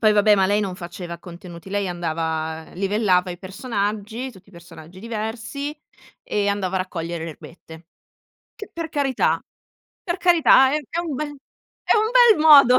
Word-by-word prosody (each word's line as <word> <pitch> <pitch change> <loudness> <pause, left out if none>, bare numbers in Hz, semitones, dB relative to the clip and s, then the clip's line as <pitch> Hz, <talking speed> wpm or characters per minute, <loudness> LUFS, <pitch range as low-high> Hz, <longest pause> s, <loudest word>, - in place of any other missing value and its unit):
poi 215 -1 +5
vabbè, 210 0 +5
ma 190 -1 +3
lei 205 +1 +2
non 195 -3 -3
faceva 175 -1 -7
contenuti, 175 0 -11
lei 200 -1 -1
andava 160 -2 -3
livellava 190 -1 +1
i 175 - -7
personaggi, 210 +4 -3
tutti 190 0 -18
i - - -20
personaggi 170 0 -13
diversi, 230 +7 -5 0.5
e 205 -1 -1
andava 195 -2 -1
a - - +2
raccogliere 170 -2 -4
le 165 - -5
erbette. 160 +1 -13 0.7
Che 420 - -9
per 335 -1 -5
carità 280 -4 +1 0.6
per 345 -3 -3
carità 315 -6 +5
è 300 - +2
è 335 - -4
un 330 -4 -4
bel 290 +2 -4 0.5
è - - +3
un 435 +1 +2
bel 480 -5 +6
modo 275 -5 +8
200 Hz, 165 wpm, -22 LUFS, 175-260 Hz, 0.7 s, modo